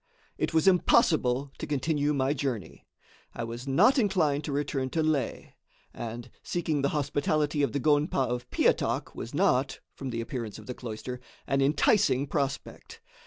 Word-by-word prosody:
It - - 0
was 160 +3 +2
impossible 140 -7 +3
to - - -4
continue 150 +1 0
my 140 -1 +1
journey, 130 -7 -4 0.5
I 120 - -3
was 120 +3 -6
not 250 - +4
inclined 165 - +1
to 150 - -3
return 140 -2 -1
to 160 +3 0
Leh; 150 -5 -1 0.4
and 120 +1 -7
seeking 160 -4 -1
the 140 - +1
hospitality 150 +1 0
of 140 - +1
the 140 - -1
gonpa 150 +2 +2
of 120 0 -4
Piatak - - +1
was 120 - -7
not, 140 -7 +2
from 135 - -6
the 115 -2 -3
appearance 115 -2 -5
of - - -12
the 125 - -5
cloister, 125 +1 -6 0.3
an 135 0 +1
enticing 140 - +3
prospect. 140 -2 -4
140 Hz, 160 wpm, -28 LUFS, 125-150 Hz, 0.5 s, not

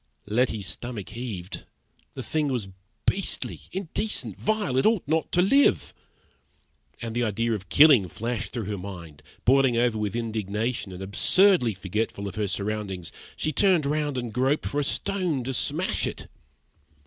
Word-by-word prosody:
Letty's 110 -1 0
stomach 120 -1 -5
heaved; 110 -7 -6 0.5
the - - -5
thing 155 -2 0
was 120 -8 -2 0.4
beastly, 195 0 -1
indecent, 195 +3 -2
vile, 215 -11 -1
it 130 - +3
ought 220 -8 +1
not 160 +2 0
to 180 - +4
live! 275 +9 +3 1.1
And 115 -1 -4
the 120 - 0
idea 115 +1 0
of 95 -4 -5
killing 140 -10 +7
flashed 115 +1 -4
through 120 -3 -3
her 100 -1 -4
mind. 85 -6 -9 0.2
Boiling 130 -1 +4
over 120 -2 +2
with 105 -1 -2
indignation 110 -1 -2
and 90 +1 -7
absurdly 125 - +4
forgetful 100 +2 -3
of 100 - -6
her 105 -2 -1
surroundings, 100 -3 -3 0.2
she 155 - -1
turned 180 -1 +3
round 145 -1 0
and 120 -3 -4
groped 135 +5 +1
for 145 - -1
a - - +1
stone 180 -3 -1
to 135 +2 -3
smash - - 0
it. - - -6
120 Hz, 155 wpm, -26 LUFS, 105-150 Hz, 1.1 s, killing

